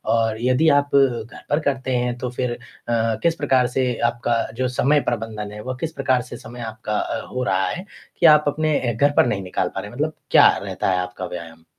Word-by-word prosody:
और 115 -1 +1
यदि 130 +6 +3
आप 145 -1 +2
घर 125 -4 +1
पर 145 - +2
करते 135 -3 -1
हैं 120 0 -1
तो 125 +1 -3
फिर 125 0 -2
अ 120 0 -9
अ, 115 -1 +1
किस 170 -1 +3
प्रकार 135 -5 +2
से 125 0 0 0.2
आपका 120 -1 -1 0.2
जो 130 - +1
समय 135 +4 +2
प्रबंधन 110 -3 -4
है 105 0 -8
वह 130 +3 -5
किस 165 - -2
प्रकार 130 -4 +1
से 125 - -9
समय 120 +2 -10
आपका 110 -1 -3
अ, - - -3
हो 125 0 -3
रहा 95 -4 +1
है 185 - -5 0.3
कि - - +3
आप 150 -2 +8
अपने 155 +1 +1
अ, 120 -2 -1
घर 140 +6 +3
पर - - +6
नहीं 100 -5 -1
निकाल 90 - -2
पा 95 - -2
रहे, 105 +1 -9
मतलब 150 +5 -2 0.2
क्या - - +8
रहता - - -3
है 90 - +1
आपका 90 0 -4
व्यायाम? 85 -2 -8
125 Hz, 230 wpm, -22 LUFS, 110-140 Hz, 0.3 s, आप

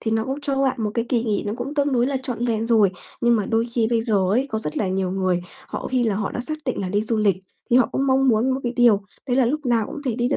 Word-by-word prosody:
thì 225 - -2
nó 220 0 +1
cũng 270 +2 -4
cho 275 -2 0
bạn 265 -1 +1
một 210 - 0
cái 230 - 0
kỳ 235 -3 +1
nghỉ 210 -3 0
nó 205 - -1
cũng 265 +5 -5
tương 285 -1 +1
đối 245 -1 +2
là 275 0 -1
trọn 240 -2 -3
vẹn 225 -1 0
rồi. 220 -4 +4 0.3
Nhưng 235 -1 +4
mà 205 - -1
đôi 230 0 +1
khi 230 -2 +2
bây 230 -1 +2
giờ 225 -2 0 0.2
ấy, 255 +7 +2
có 220 - -1
rất 150 -8 -5
là 200 - 0
nhiều 185 0 -1
người 185 -2 0 0.3
họ - - -5
khi 255 -1 +2
là 220 -3 +1
họ 210 0 -2
đã - - -3
xác 310 +5 -3
định 255 - -1
là 190 - -2
đi 205 +3 0
du 225 +1 -1
lịch, 205 -4 +2 0.3
thì 240 - +5
họ 255 - +5
cũng 275 - 0
mong 265 0 +3
muốn 235 +2 +3
một 265 +1 -1
cái 240 0 -2
điều 235 -5 +5 0.3
đấy 250 -1 0
là 255 -3 +4
lúc 295 +2 -2
nào 230 -3 +2
cũng 280 - -8
có 300 - -6
thể 250 -4 -1
đi 240 0 +1
được 275 - +1
235 Hz, 330 wpm, -22 LUFS, 215-260 Hz, 0.3 s, thì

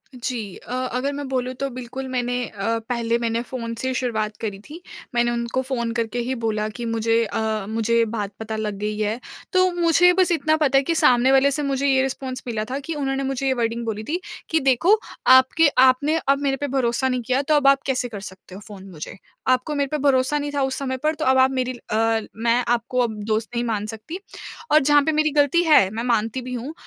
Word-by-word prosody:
जी 235 -6 -4
अ, - - -9
अगर 255 +2 -2
मैं 285 0 -5
बोलूँ 255 -1 -2
तो 275 - -1
बिल्कुल 255 +2 -6
मैंने 245 -1 -2
अ, 225 +3 -2
पहले 235 -1 0
मैंने 230 0 -1
फ़ोन 235 -1 -5
से 260 - -2
ही 260 - -1
शुरुआत 215 -4 -2
करी 205 -3 -4
थी। 330 +4 -9 0.3
मैंने 240 0 +2
उनको 235 +2 -1
फ़ोन 250 -3 -2
करके 230 +1 -2
ही 250 +2 -2
बोला 215 -1 0
कि 235 +2 -7
मुझे 230 0 +1
अ, 220 -1 -2
मुझे 225 +1 0
ये 230 - +4
बात 210 -3 -4
पता 220 0 -5
लग 210 -2 -3
गई 210 0 -3
है। 215 +2 -1 0.3
तो 370 0 +4
मुझे 340 +1 +5
बस 360 -1 +2
इतना 315 -1 +2
पता 280 -3 +3
है 270 - +3
कि 330 +4 -1
सामने 255 -3 +4
वाले 270 +1 +4
से 295 +2 -1
मुझे 280 0 0
ये 265 -1 +3
रिस्पॉन्स 260 -1 -4
मिला 225 -3 -2
था 270 - -2
कि 320 +4 -5
उन्होंने 275 -2 -2
मुझे 270 0 -2
ये 265 - +3
वर्डिंग 235 -1 -2
बोली 215 -1 -3
थी 320 +10 -2 0.3
कि 320 - +2
देखो 310 - +3 0.3
आपके 260 +5 +6
आपने 260 +5 +4
अब 275 0 +3
मेरे 275 -1 0
पे 285 - -3
भरोसा 260 -1 0
नहीं 255 -1 -1
किया 255 +3 0
तो 300 +2 +1
अब 290 -2 +3
आप 275 0 +5
कैसे 255 -2 0
कर 210 -3 -7
सकते 190 -1 -11
हो 200 - -10
फ़ोन 200 -3 -10
मुझे? 165 +2 -8 0.3
आपको 255 +4 +1
मेरे 280 -1 0
पे 305 - 0
भरोसा 270 +1 +3
नहीं 290 0 -3
था 285 - 0
उस 265 0 -1
समय 260 -2 -2
पर 310 +1 +2
तो - - -3
अब 260 0 +4
आप 260 0 +5
मेरी 255 -1 -1 0.2
अ, 225 +1 +2
मैं 235 +2 +1
आपको 240 +1 0
अब 225 -3 0
दोस्त 220 +1 -1
नहीं 235 - 0
मान 215 -3 -2
सकती। 225 - -7 0.5
और 305 - +7
जहाँ 290 0 +4
पे 315 - +1
मेरी 310 0 +2
गलती 290 +4 +3
है, 300 - +5
मैं 220 +3 -4
मानती 230 +1 0
भी 250 0 -7
हूँ 250 +5 -5
255 Hz, 235 wpm, -22 LUFS, 230-275 Hz, 0.5 s, और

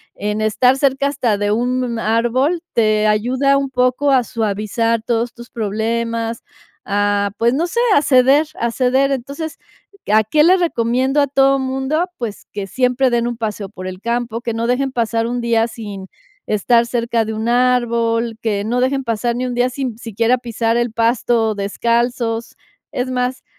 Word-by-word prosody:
en 210 +1 -2
estar 220 +4 +3
cerca 275 0 +1
hasta 245 -7 0
de 205 0 0
un 245 +1 -1
árbol, 245 +10 +1
te 215 -2 +2
ayuda 255 +6 +2
un 275 -1 -1
poco 255 +2 +1
a 255 -2 +4
suavizar 220 +1 -1
todos 235 0 -1
tus 240 +1 -12
problemas, 230 +1 -2 0.4
a, 205 0 0
pues, 235 +1 +2
no 325 +6 0
sé, 420 +7 -2 0.2
a - - +5
ceder, 275 +2 +4
a 235 - 0
ceder. 265 +3 +2
Entonces, 280 +5 -5 0.5
ah, 215 0 +5
¿qué 300 +8 +3
le 370 +3 +5
recomiendo 265 -3 +1
a 285 - +2
todo 275 0 +3
mundo?, 265 +5 -1
pues, 225 -4 -6
que 200 -1 -4
siempre 255 +3 +1
den 235 0 0
un 240 -1 -4
paseo 210 -3 -4
por 185 -3 -8
el 185 0 -7
campo, 235 0 -2
que 235 -1 -3
no 230 +1 -2
dejen 265 +2 0
pasar 230 -2 0
un 245 +1 -2
día 230 -1 +2
sin 205 -5 -8 0.4
estar 230 +3 +2
cerca 235 -1 -1
de 220 - -4
un 220 +2 -2
árbol, 235 -2 +1
que 210 -3 -1
no 235 +4 -1
dejen 270 +1 0
pasar 235 0 -1
ni 255 +1 -2
un 245 - -4
día 245 +1 +2
sin 255 -4 -4
siquiera 230 +2 0
pisar 230 -1 -1
el 240 -2 -1
pasto 230 -1 +1
descalzos. 235 +3 -1 0.4
Es 255 +1 -2
más, 250 +1 -2
235 Hz, 175 wpm, -18 LUFS, 225-255 Hz, 0.5 s, a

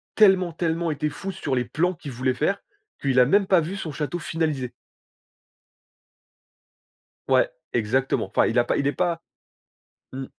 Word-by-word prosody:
tellement, 190 -4 +5
tellement 165 0 -1
été 150 +1 -1
fou 170 +7 -6
sur 150 -8 -2
les 125 - +1
plans 165 +9 0
qu'il 145 -4 -9
voulait 130 +1 0
faire, 175 +9 0 0.4
qu'il 135 -2 +2
a 125 - +7
même 195 +8 +3
pas 185 -3 +5
vu 170 +5 -4
son 165 -5 -5
château 150 +4 -3
finalisé. 155 -7 -2 2.6
Ouais, - - +4 0.2
exactement, 120 +4 +1
enfin, - - +2
il - - +1
a 120 - +5
pas - - 0
il 140 - 0
est 140 - +2
pas 170 +2 -1 0.9
mmh. 135 0 -5
155 Hz, 160 wpm, -24 LUFS, 130-175 Hz, 2.6 s, a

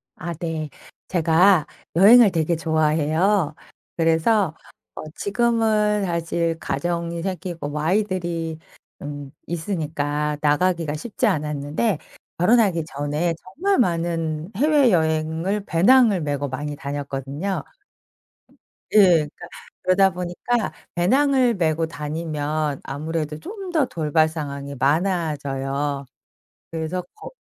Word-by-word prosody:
아 170 +2 -5
네. 160 -1 -4 0.4
제가 170 0 +4 0.3
여행을 210 +3 +8
되게 165 0 +1
좋아해요. 160 +2 +1 0.4
그래서 165 +2 +2 0.4
어 - - -6
지금은 215 -2 +1
사실 170 -1 -1
가정이 170 +2 -2
생기고 180 -5 -4
뭐 150 +1 -3
아이들이 170 -3 -1 0.4
음 145 -1 -7 0.2
있으니까 150 -4 -2
나가기가 160 +1 +1
쉽지 230 +8 -2
않았는데 150 +4 -1 0.4
결혼하기 185 -2 +3
전에 150 +3 -2
정말 375 - 0
많은 165 -4 -1
해외여행을 190 - +2
배낭을 210 +2 +4
메고 145 -1 -2
많이 145 +3 -4
다녔거든요. 140 +5 -4 1.3
예. - - +5
그러니까 175 -3 +3 0.4
그러다 190 +1 +4
보니까 180 +6 -2 0.2
배낭을 260 +6 +3
메고 165 -2 0
다니면 150 -1 -3
아무래도 155 +1 -4
좀 410 - -8 0.2
더 310 -5 +3
돌발 155 - +1
상황이 140 -3 -6
많아져요. 140 -3 -1 0.7
그래서 165 +2 -3
거 430 - -10
165 Hz, 245 characters per minute, -22 LUFS, 150-190 Hz, 1.3 s, 여행을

